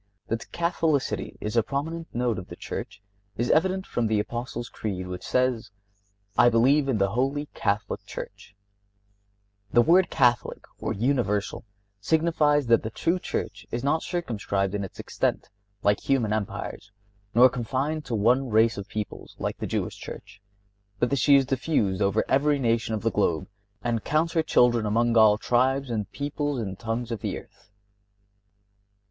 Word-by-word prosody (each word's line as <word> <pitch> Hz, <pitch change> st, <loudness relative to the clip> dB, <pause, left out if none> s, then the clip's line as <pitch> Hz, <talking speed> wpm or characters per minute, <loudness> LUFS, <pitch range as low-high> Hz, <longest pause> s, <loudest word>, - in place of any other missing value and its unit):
That 115 Hz, 0 st, -3 dB
Catholicity 165 Hz, -4 st, -1 dB
is 105 Hz, +2 st, -4 dB
a 115 Hz, -, +5 dB
prominent 160 Hz, +7 st, -4 dB
note 120 Hz, -3 st, 0 dB
of 90 Hz, -, -9 dB
the -, -, -9 dB
Church 95 Hz, +1 st, -7 dB, 0.3 s
is 120 Hz, +2 st, +1 dB
evident 190 Hz, +3 st, +2 dB
from 120 Hz, -2 st, -1 dB
the 110 Hz, -1 st, +1 dB
Apostles' 120 Hz, +2 st, -4 dB
Creed, 100 Hz, -6 st, -4 dB
which 90 Hz, 0 st, -6 dB
says: 125 Hz, -2 st, 0 dB, 0.7 s
"I 120 Hz, -, +6 dB
believe 135 Hz, +5 st, +3 dB
in 125 Hz, -, +2 dB
the 100 Hz, -1 st, +1 dB
Holy 135 Hz, +6 st, 0 dB
Catholic 105 Hz, +1 st, -1 dB
Church." 100 Hz, -, -9 dB, 1.2 s
The 120 Hz, -, +5 dB
word 175 Hz, +5 st, +4 dB
Catholic, 120 Hz, -2 st, +1 dB, 0.2 s
or -, -, -2 dB
Universal, 110 Hz, -3 st, 0 dB, 0.3 s
signifies 150 Hz, +2 st, +2 dB
that 115 Hz, -1 st, +4 dB
the 110 Hz, -, -4 dB
true 170 Hz, +10 st, 0 dB
Church -, -, -4 dB
is 120 Hz, +1 st, -3 dB
not 155 Hz, +3 st, +2 dB
circumscribed 105 Hz, -, -2 dB
in 100 Hz, -1 st, -2 dB
its 95 Hz, -, -8 dB
extent, -, -, -2 dB, 0.3 s
like 100 Hz, 0 st, +3 dB
human 120 Hz, -6 st, +1 dB
empires, 105 Hz, -1 st, -4 dB, 0.4 s
nor 125 Hz, +2 st, +8 dB
confined 130 Hz, +5 st, -2 dB
to 115 Hz, -, -2 dB
one 125 Hz, +5 st, +2 dB
race 110 Hz, 0 st, +3 dB
of 100 Hz, -, -7 dB
people, 105 Hz, -1 st, -5 dB
like -, -, -3 dB
the -, -, -3 dB
Jewish -, -, -2 dB
Church, 100 Hz, -, -10 dB, 0.6 s
but 120 Hz, -, 0 dB
that 140 Hz, -, +2 dB
she 145 Hz, -, +6 dB
is 135 Hz, -1 st, +5 dB
diffused 125 Hz, -7 st, 0 dB
over 100 Hz, +2 st, +2 dB
every 145 Hz, +2 st, +3 dB
nation 115 Hz, -3 st, 0 dB
of 105 Hz, -, -5 dB
the 115 Hz, -, +1 dB
globe, 95 Hz, -4 st, 0 dB, 0.4 s
and 115 Hz, -2 st, -1 dB
counts 160 Hz, +2 st, +1 dB
her 165 Hz, -, +3 dB
children 120 Hz, -7 st, +3 dB
among 115 Hz, +2 st, +2 dB
all 110 Hz, -2 st, +6 dB
tribes 130 Hz, +3 st, +1 dB
and 105 Hz, -4 st, -3 dB
peoples 145 Hz, 0 st, -2 dB
and 95 Hz, -4 st, -5 dB
tongues 115 Hz, +2 st, -3 dB
of 115 Hz, -, -3 dB
the -, -, -2 dB
earth. -, -, -15 dB
120 Hz, 165 wpm, -26 LUFS, 105-140 Hz, 1.2 s, nor